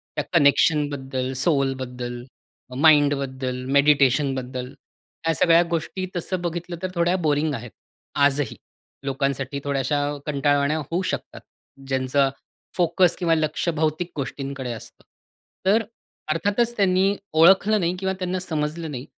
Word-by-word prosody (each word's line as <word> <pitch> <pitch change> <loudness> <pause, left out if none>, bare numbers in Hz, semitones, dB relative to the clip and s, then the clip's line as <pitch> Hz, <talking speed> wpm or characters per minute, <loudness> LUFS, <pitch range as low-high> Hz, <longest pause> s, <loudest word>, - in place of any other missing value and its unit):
त्या - - -1
कनेक्शनबद्दल, 140 -4 +2
सोलबद्दल, 130 -5 -1 0.5
माइंडबद्दल 140 -4 +2
मेडिटेशनबद्दल. 135 -3 +2 0.6
ह्या 165 - +2
सगळ्या 170 +1 +5
गोष्टी 170 +3 -2
तसं 180 +1 -2
बघितलं 175 0 -4
तर 185 - -1
थोड्या 170 +1 +2
बोरिंग 150 +1 +1
आहेत 115 -1 -8 0.5
आजही. 145 0 0 0.5
लोकांसाठी 135 0 -2
थोड्याशा 140 0 0 0.3
कंटाळवाण्या 145 0 +1
होऊ 165 +4 -2
शकतात - - -6 0.5
ज्यांचं 135 +1 +1 0.5
फोकस 175 0 +3
किंवा 170 -3 +2
लक्ष 155 +1 -1
भौतिक 160 +3 -1
गोष्टींकडे 135 -2 -4
असतं. 115 - -10 0.6
तर 210 +4 +4
अ, - - -9 0.5
अर्थातच 205 +9 0
त्यांनी 195 0 +3 0.2
ओळखलं 190 +6 +5
नाही 175 -1 0
किंवा 190 0 -1
त्यांना 185 0 -2
समजलं 160 -2 -2
नाही. 130 -1 -6
150 Hz, 115 wpm, -23 LUFS, 135-170 Hz, 0.6 s, सगळ्या